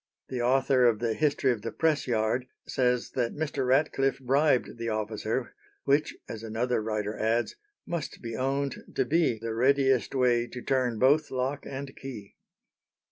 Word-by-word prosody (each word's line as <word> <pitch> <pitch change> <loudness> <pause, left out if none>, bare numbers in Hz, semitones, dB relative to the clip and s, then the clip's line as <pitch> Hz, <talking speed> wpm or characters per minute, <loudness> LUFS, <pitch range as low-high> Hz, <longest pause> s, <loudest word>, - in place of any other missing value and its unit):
The 125 -2 -2
author 130 +1 +3
of 115 -2 +3
the 115 0 -1
"History 140 0 +2
of 115 -4 -3
the - - -4
Press 160 -3 +1
yard" 120 +2 0 0.2
says 125 -2 +1
that 120 -2 -1
Mr. 145 -4 -2
Ratcliffe 135 0 +2
bribed 135 -1 +2
the 115 0 -2
officer, 110 +3 -2 0.3
"which," 145 +2 +1
as 110 - -6
another 115 +2 -1
writer 105 -1 -2
adds, 115 +2 0 0.3
"must 170 -3 -4
be 115 -1 -6
owned 135 +3 -1 0.2
to 130 - +2
be 155 -4 +2
the 115 +1 -4
readiest 135 +2 +2
way 120 -2 +3
to 125 +1 -8
turn 130 -4 +1
both 145 +6 +4
lock 130 +2 -2
and 135 0 -6
key." 115 -7 -9
125 Hz, 160 wpm, -28 LUFS, 115-135 Hz, 0.3 s, both